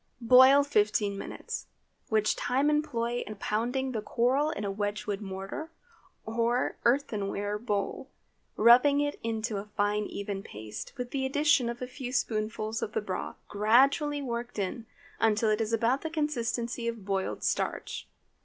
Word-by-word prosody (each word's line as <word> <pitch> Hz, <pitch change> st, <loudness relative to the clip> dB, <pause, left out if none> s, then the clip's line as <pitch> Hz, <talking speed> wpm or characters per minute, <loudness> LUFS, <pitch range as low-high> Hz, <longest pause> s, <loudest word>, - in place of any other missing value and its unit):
Boil 260 Hz, +4 st, +8 dB
fifteen 210 Hz, -6 st, +1 dB
minutes, 195 Hz, -, -6 dB, 0.4 s
which 215 Hz, -1 st, +2 dB
time 270 Hz, +4 st, +1 dB
employ 240 Hz, -5 st, 0 dB
in 215 Hz, -, -6 dB
pounding 245 Hz, +6 st, -1 dB
the 220 Hz, -4 st, -2 dB
coral 260 Hz, +7 st, +1 dB
in 210 Hz, -9 st, -4 dB
a 200 Hz, -, -1 dB
Wedgewood 205 Hz, 0 st, -3 dB
mortar, 195 Hz, +10 st, -6 dB, 0.6 s
or 235 Hz, +2 st, 0 dB
earthenware 210 Hz, -5 st, 0 dB
bowl, 205 Hz, -3 st, -2 dB, 0.5 s
rubbing 250 Hz, +6 st, +6 dB
it 290 Hz, 0 st, -1 dB
into 225 Hz, -1 st, -2 dB
a 205 Hz, +1 st, -6 dB
fine, 205 Hz, 0 st, +1 dB
even 200 Hz, -1 st, -4 dB
paste, 105 Hz, -, -8 dB
with 245 Hz, -1 st, -5 dB
the 270 Hz, -1 st, -1 dB
addition 290 Hz, -1 st, +3 dB
of 240 Hz, +1 st, -5 dB
a -, -, -4 dB
few 255 Hz, -1 st, -6 dB
spoonfuls 215 Hz, -2 st, -1 dB
of 210 Hz, -, -3 dB
the -, -, +1 dB
broth, 190 Hz, -3 st, -4 dB
gradually 275 Hz, +7 st, +3 dB
worked 235 Hz, -2 st, -4 dB
in 210 Hz, +3 st, -3 dB, 0.3 s
until 220 Hz, 0 st, +3 dB
it 215 Hz, +1 st, +1 dB
is 220 Hz, 0 st, -1 dB
about 230 Hz, +4 st, +2 dB
the 320 Hz, -, -3 dB
consistency 240 Hz, -6 st, -2 dB
of 230 Hz, -4 st, -4 dB
boiled 195 Hz, -1 st, -2 dB
starch. -, -, -2 dB
230 Hz, 150 wpm, -29 LUFS, 210-260 Hz, 0.6 s, Boil